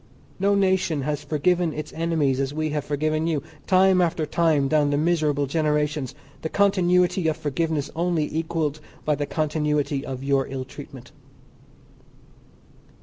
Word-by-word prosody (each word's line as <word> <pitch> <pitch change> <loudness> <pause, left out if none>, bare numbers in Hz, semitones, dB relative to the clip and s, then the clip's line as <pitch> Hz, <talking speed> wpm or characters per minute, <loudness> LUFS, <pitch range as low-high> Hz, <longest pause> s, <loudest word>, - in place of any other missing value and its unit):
No 200 +1 +3
nation 185 -6 +1
has 150 0 -2
forgiven 165 +3 +1
its 155 0 -6
enemies 160 -5 0
as 135 +1 -2
we 155 0 -1
have 150 -1 -1
forgiven 155 +2 -1
you, 155 -4 -1 0.2
time 185 -1 +5
after 165 -2 0
time 155 -3 +2
down 150 0 +2
the 145 - +1
miserable 150 -3 +1
generations, 150 -2 0 0.3
the 160 - -3
continuity 180 -3 +2
of 160 - 0
forgiveness 150 0 -2
only 170 -2 0
equalled 160 -2 -1 0.3
by 150 - +2
the 145 0 -2
continuity 150 -2 0
of 130 0 -6
your 135 -1 +1
ill 130 -1 -5
treatment. 130 -2 -11
155 Hz, 145 wpm, -24 LUFS, 145-170 Hz, 0.3 s, time